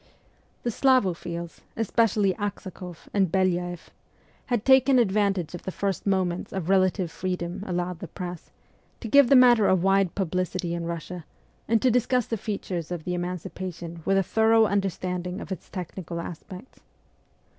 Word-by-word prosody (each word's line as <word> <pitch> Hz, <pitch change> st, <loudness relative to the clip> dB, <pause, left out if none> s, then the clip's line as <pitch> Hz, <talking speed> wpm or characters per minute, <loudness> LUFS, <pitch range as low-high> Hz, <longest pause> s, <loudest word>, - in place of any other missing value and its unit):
The 240 Hz, -, 0 dB
Slavophiles, 180 Hz, -10 st, 0 dB, 0.2 s
especially 215 Hz, -3 st, +2 dB
Aksakoff 190 Hz, -4 st, -6 dB
and 195 Hz, -4 st, +2 dB
Belyaeff, 175 Hz, -2 st, -1 dB, 0.6 s
had 240 Hz, -4 st, -1 dB
taken 265 Hz, 0 st, +6 dB
advantage 200 Hz, -6 st, +1 dB
of 175 Hz, -, -6 dB
the 190 Hz, -, -5 dB
first 195 Hz, 0 st, -2 dB
moments 185 Hz, -3 st, 0 dB
of 190 Hz, -2 st, -4 dB
relative 185 Hz, -2 st, +2 dB
freedom 180 Hz, +1 st, -4 dB
allowed 180 Hz, -1 st, -2 dB
the -, -, -6 dB
press, 180 Hz, -3 st, -7 dB, 0.5 s
to 230 Hz, -, -6 dB
give 280 Hz, +2 st, +6 dB
the 275 Hz, -, +7 dB
matter 245 Hz, -4 st, +7 dB
a -, -, +5 dB
wide 195 Hz, 0 st, +2 dB
publicity 185 Hz, -1 st, -2 dB
in 170 Hz, -1 st, -3 dB
Eussia, 170 Hz, 0 st, -6 dB, 0.4 s
and 225 Hz, -1 st, +2 dB
to 255 Hz, -, +5 dB
discuss 250 Hz, 0 st, +2 dB
the 230 Hz, -, -2 dB
features 195 Hz, -6 st, -4 dB
of 175 Hz, -3 st, -4 dB
the 180 Hz, -, -3 dB
emancipation 175 Hz, -1 st, -5 dB
with 195 Hz, +3 st, +2 dB
a 195 Hz, -, +3 dB
thorough 225 Hz, +3 st, +4 dB
understanding 185 Hz, -2 st, -2 dB
of -, -, -9 dB
its 190 Hz, -, -6 dB
technical 175 Hz, -1 st, -6 dB
aspects. 180 Hz, +7 st, -9 dB
185 Hz, 150 wpm, -26 LUFS, 175-210 Hz, 0.6 s, the